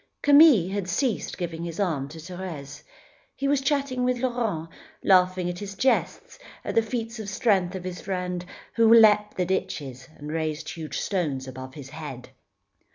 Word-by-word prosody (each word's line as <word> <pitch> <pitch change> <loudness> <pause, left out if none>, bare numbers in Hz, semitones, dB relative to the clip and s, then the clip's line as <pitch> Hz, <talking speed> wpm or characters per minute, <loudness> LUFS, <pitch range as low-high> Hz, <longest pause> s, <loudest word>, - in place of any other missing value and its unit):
Camille 285 - +7
had 200 -2 -2
ceased 235 +4 -1
giving 170 -2 -4
his 170 +1 -6
arm 160 -9 0
to 160 - -10
Thérèse. 160 -4 -7 0.5
He 275 - -2
was 280 -1 +2
chatting 275 -2 0
with 250 0 +1
Laurent, 235 -10 -1 0.4
laughing 185 -1 +4
at 175 0 -3
the 200 +1 -7
jests, 260 +5 0 0.3
at - - -2
the 230 - +4
feats 225 0 -4
of 210 -2 -5
strength 190 -4 +1
of 185 - -5
his 180 -1 -6
friend, 180 -2 -3 0.3
who 230 -1 +4
leapt 210 -2 +6
the 180 - +1
ditches 135 -8 -3
and 150 +1 -7
raised 155 -1 -3
huge 160 -2 -5
stones 150 -9 -2
above 130 0 -8
his 140 -3 -10
head. 145 -5 -8
185 Hz, 165 wpm, -26 LUFS, 160-225 Hz, 0.5 s, Camille